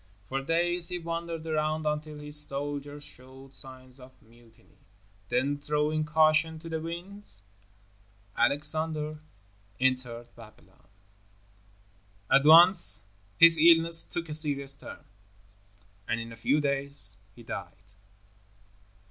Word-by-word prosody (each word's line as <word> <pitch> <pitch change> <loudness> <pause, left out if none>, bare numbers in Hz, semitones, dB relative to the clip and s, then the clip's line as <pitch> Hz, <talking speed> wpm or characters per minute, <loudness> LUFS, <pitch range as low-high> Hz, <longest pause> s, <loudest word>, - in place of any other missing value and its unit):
For 135 +5 -4
days 170 +4 -1
he 180 - -4
wandered 165 -1 -6
around 155 0 -2
until 150 0 -4
his 150 0 -1
soldiers 145 0 -3
showed 130 +1 -12
signs 130 0 -10
of 130 0 -17
mutiny. 115 0 -24 0.5
Then, 140 +3 -1
throwing 150 +1 -2
caution 155 +1 +1
to 165 +1 -11
the 160 -1 -4
winds, 170 - -8 0.9
Alexander 150 +4 0 0.6
entered 125 -2 -2
Babylon. 115 -2 -19 1.4
At 140 +1 +4
once 160 - +6 0.3
his 165 -1 +7
illness 165 0 +6
took 170 -1 -7
a 150 - -7
serious 140 -3 +2
turn, 135 - -13 1.0
and 115 +1 -2
in 115 0 -8
a - - -10
few 135 +7 0
days 140 -8 +2 0.2
he 120 - -15
died. 105 - -8
150 Hz, 115 wpm, -27 LUFS, 130-160 Hz, 1.4 s, his